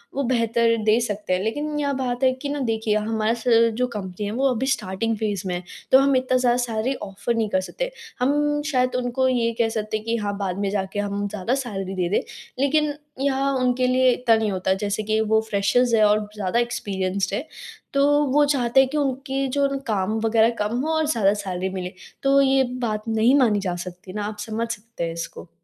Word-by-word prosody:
वो 280 - 0
बेहतर 230 -2 +2
दे 215 +2 +4
सकते 210 -4 -2
हैं 180 - +1
लेकिन 295 +6 -2
यह 285 -1 0
बात 255 -1 -2
है 260 - +5
कि 270 +2 -6
ना 290 - -2
देखिए, 225 -4 0
हमारा 220 +1 0
स 225 - -10 0.3
जो 250 0 +1
कंपनी 205 -3 -5
है 205 - -3
वो 265 +4 +2
अभी 245 +2 -2
स्टार्टिंग 225 -3 -1
फेज 205 -3 -2
में 185 - -2
है 175 - -5 0.3
तो 265 - +8
हम 275 0 +3
इतना 255 0 +2
ज़्यादा 245 -1 +2
सैलरी 245 +1 -1
ऑफर 205 +3 -3
नहीं 220 -2 0
कर 185 - +1
सकते। - - -4 0.3
हम 295 +3 +1
शायद 255 -2 +1
उनको 250 +1 0
ये 240 -2 +1
कह 230 -1 +3
सकते 215 -1 -2
हैं 215 - -11
कि 230 - 0
हाँ 205 -2 -2
बाद 190 -2 -3
में 200 -1 0
जाके 200 0 -2
हम 205 0 -2
ज़्यादा 210 +5 -1
सैलरी 195 -8 -4
दे 180 -2 -1
दें 200 - +2 0.4
लेकिन 290 +2 +2 0.3
यहाँ 275 0 +1
उनके 255 0 +1
लिए 255 0 +4
इतना 240 -2 +3
नहीं 220 -2 0
होता 190 0 0
जैसे 205 +1 -1
कि 215 +1 0
वो 220 0 +2
फ्रेशर्स 215 +5 +2
है 220 - +5
और 210 0 +2
ज़्यादा 205 +2 0
एक्सपीरियंस्ड 195 -5 -2
हैं, 255 - -3 0.5
तो 280 0 +4 0.3
वो 295 +1 +5
चाहते 265 -3 +2
हैं 265 -1 +4
कि 300 - -2
उनकी 270 -1 -1
जो 280 0 +3 0.2
काम 215 +1 0
वग़ैरह 225 0 +4 0.2
कम 225 +3 -2
हो 320 +2 -1
और 315 - +1
ज़्यादा 215 -9 +3
सैलरी 185 0 -2
मिले। 185 -1 -5 0.3
तो 275 0 +4
ये 270 0 +4 0.2
बात 215 0 -3
नहीं 225 +4 +3
मानी 220 -6 +3
जा 185 -3 -2
सकती 180 +1 -10
ना 210 0 -3
आप 210 0 -5
समझ 225 +1 -2
सकते 225 -3 -6
हैं 165 0 -2
इसको। 165 +1 -7
225 Hz, 220 wpm, -23 LUFS, 205-260 Hz, 0.5 s, तो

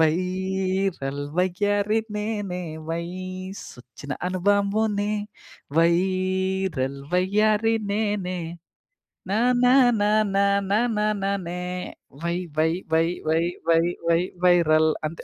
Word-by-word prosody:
Viral 185 -3 0 0.2
వయ్యారి 205 +4 +1 0.2
నేనే, 205 -4 -3 0.3
వైసొచ్చిన 175 -6 -7 0.2
అనుబాంబునే. 205 +2 +1 0.7
Viral 185 -4 +1 0.2
వయ్యారి 210 +4 +2 0.2
నేనే 205 -4 -1 0.9
నా 205 - +1 0.3
నా 250 - +6 0.3
నా 205 0 +2 0.3
నా 200 - +4 0.3
నా 210 - +4 0.2
నా 210 - +1 0.2
నానే. 190 -3 -2 0.6
Why 170 0 0 0.2
why 160 +1 +3 0.2
why 165 +1 +4 0.2
why 160 +1 +2 0.2
why 165 0 +5 0.3
why 165 0 +4 0.2
viral. 160 -3 +5 0.2
అంతే. 160 +2 -5
185 Hz, 90 wpm, -24 LUFS, 170-205 Hz, 0.9 s, నా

